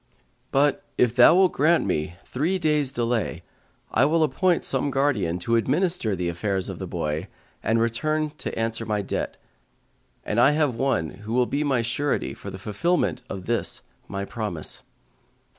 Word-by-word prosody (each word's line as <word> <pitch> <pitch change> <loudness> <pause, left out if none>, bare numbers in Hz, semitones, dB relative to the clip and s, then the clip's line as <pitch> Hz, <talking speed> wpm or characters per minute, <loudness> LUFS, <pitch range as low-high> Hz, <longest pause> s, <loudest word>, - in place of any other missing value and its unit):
But, 140 +1 +2
if 120 -1 +3
thou 125 +6 +8
wilt 185 -1 +5
grant 160 +4 +3
me 80 -3 -1
three 160 +9 0
days' 150 -5 +1
delay, 115 -9 -1 0.5
I 110 - +3
will 160 +2 +3
appoint 170 +5 +2
some 135 +1 +1
guardian 130 -12 +1
to 115 - +2
administer 130 - +1
the 90 -1 -2
affairs 95 +2 -1
of - - -6
the - - -4
boy 75 +5 -3 0.3
and 115 +1 +1
return 155 +7 0
to - - -4
answer 115 0 -1
my 105 -2 -1
debt; - - -3 0.9
and 105 - 0
I 140 +4 +6
have 150 -4 +2
one 115 - 0
who 110 +2 -5
will 125 0 +3
be 145 +4 -1
my 130 -5 +1
surety 130 +5 -1
for - - -8
the - - -7
fulfillment 115 - 0
of 95 -2 -6
this 120 0 -2 0.2
my 100 0 -4
promise." 105 -8 -3
120 Hz, 165 wpm, -25 LUFS, 105-145 Hz, 0.9 s, thou